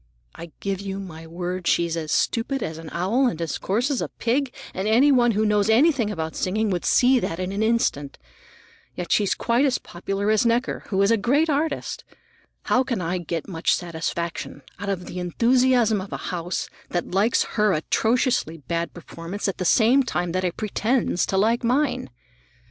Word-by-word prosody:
I 170 -1 -10
give 195 -1 -2
you 195 -1 -5
my 165 -4 -9
word 180 +2 -4
she's 170 -1 +2
as 155 -2 -4
stupid 260 +4 0
as 160 0 -5
an 165 -1 -8
owl 215 +10 +1
and 170 -9 -2
as 165 -3 -3
coarse 235 +9 0
as 265 - 0
a - - -1
pig, 255 +3 -1 0.2
and 190 +3 -2
any 250 +7 +5
one 240 -3 +4
who 215 +2 +1
knows 210 0 +2
anything 250 -1 +4
about 160 -5 -4
singing 210 +3 0
would 175 -2 -2
see 255 +1 +4
that 165 - -3
in 185 0 -2
an 200 +2 -2
instant. 220 -11 0 0.8
Yet 180 - -5
she's 205 -2 +2
quite 235 +3 +1
as 270 -3 +2
popular 195 +4 -3
as 215 - +3
Necker, 235 +2 0
who's 200 +1 +2
a 230 - +4
great 285 +9 +2
artist. 300 +3 -2 0.6
How 255 - +2
can 245 -5 -2
I 180 +1 -2
get 170 -1 -4
much 165 -4 +1
satisfaction 170 -3 -4 0.2
out 200 +1 -4
of 185 -2 -2
the 180 - -6
enthusiasm 235 +3 +2
of 190 - -9
a - - -3 0.2
house 175 +1 -3 0.2
that 175 - -3
likes 200 +5 +2
her 210 -1 +2
atrociously 220 - +1
bad 170 +4 -3
performance 175 +4 -6
at 195 - -3
the 185 - -2
same 235 +9 +5
time 175 -9 -2
that 185 +2 -1
it 180 -2 -2
pretends 215 -2 0
to 190 - 0
like 225 +5 +2
mine? 255 - 0
200 Hz, 190 wpm, -24 LUFS, 175-235 Hz, 0.8 s, any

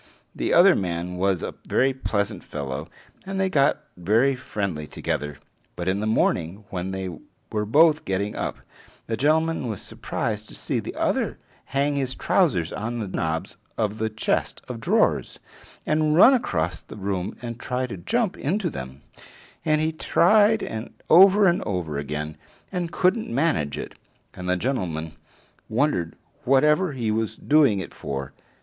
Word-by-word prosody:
The - - -2
other - - +7
man 90 -1 -3
was 95 -1 +1
a - - -4 0.2
very 135 +1 +3
pleasant 105 -6 -2
fellow, 70 -3 -5 0.4
and 195 0 -4
they 190 -1 +1
got 140 -2 +3
very 110 +10 +2
friendly 100 -11 -4
together; 75 0 -3 0.4
but 85 - -4
in 95 +2 +1
the 110 - -1
morning, 100 -2 0
when 90 0 -3
they 95 -1 -4 0.4
were 105 -1 -1
both 155 +5 +5
getting 100 -3 -2
up, - - -3 0.5
the 115 - -2
gentleman 155 +2 +1
was 110 -4 -3
surprised 110 -2 -4
to - - -11
see - - -2
the - - -6
other - - 0 0.3
hang 140 +2 0
his 130 -2 -2
trousers 95 - +1
on 115 +3 -3
the 110 -3 -3
knobs 80 -3 -3 0.2
of 110 -1 -1
the 110 0 0
chest 110 0 -1
of - - -6
drawers - - +1 0.5
and 155 0 +2
run 230 +10 +8
across 85 - -1
the - - -11
room 95 -2 -3
and 120 -1 -6
try 125 +1 -2
to 120 - -6
jump 215 - 0
into 175 +3 -1
them, 65 +1 -8 0.6
and 155 -1 +2
he 160 +1 +1
tried 210 +7 +4 0.5
over 195 +4 +8
and 175 0 +2
over 85 -8 -2
again, 75 +2 -4 0.3
and 175 -2 -2
couldn't 185 +7 +1
manage 120 - 0
it; - - -6 0.4
and 90 0 -6
the 90 - +2
gentleman 90 - -2 0.6
wondered 110 - 0 0.3
whatever 150 +6 +3
he 115 -5 -1
was 110 0 -1
doing 145 -9 +3
it 95 - -7
for. 70 -1 -5
110 Hz, 155 wpm, -24 LUFS, 90-150 Hz, 0.6 s, run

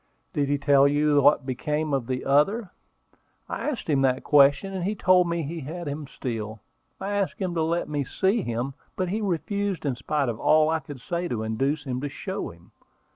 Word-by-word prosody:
"Did 140 -2 0
he 145 - +2
tell 140 -1 +5
you 145 0 +3
what 145 0 +4
became 150 +4 -2
of 130 -4 0
the 130 -1 -3
other?" 185 +10 +2 0.8
"I - - -3
asked 265 -7 -5
him 145 -4 +2
that 130 -1 +2
question, 145 +6 +4
and 185 -2 -3
he 205 +4 -1
told 185 -3 +4
me 170 -1 -1
he 165 +4 -5
had 160 +4 -6
him 145 0 -4
still. 110 -4 -5 0.4
I 195 - -3
asked 200 -2 -1
him 185 -3 -2
to 165 - 0
let 165 +2 0
me 145 -1 -1
see 195 - +1
him, 120 0 -3 0.2
but 185 -1 -1
he 215 +4 -1
refused 195 -1 -2
in 140 - +1
spite 140 +3 -1
of 115 -1 -3
all 155 0 +4
I 160 - +1
could 140 -3 -10
say 175 +5 -2
to 115 -8 -2
induce 135 +7 -1
him 130 -3 -3
to 145 - -3
show 190 +6 -5
him. 85 +1 -17
150 Hz, 210 wpm, -26 LUFS, 135-175 Hz, 0.8 s, tell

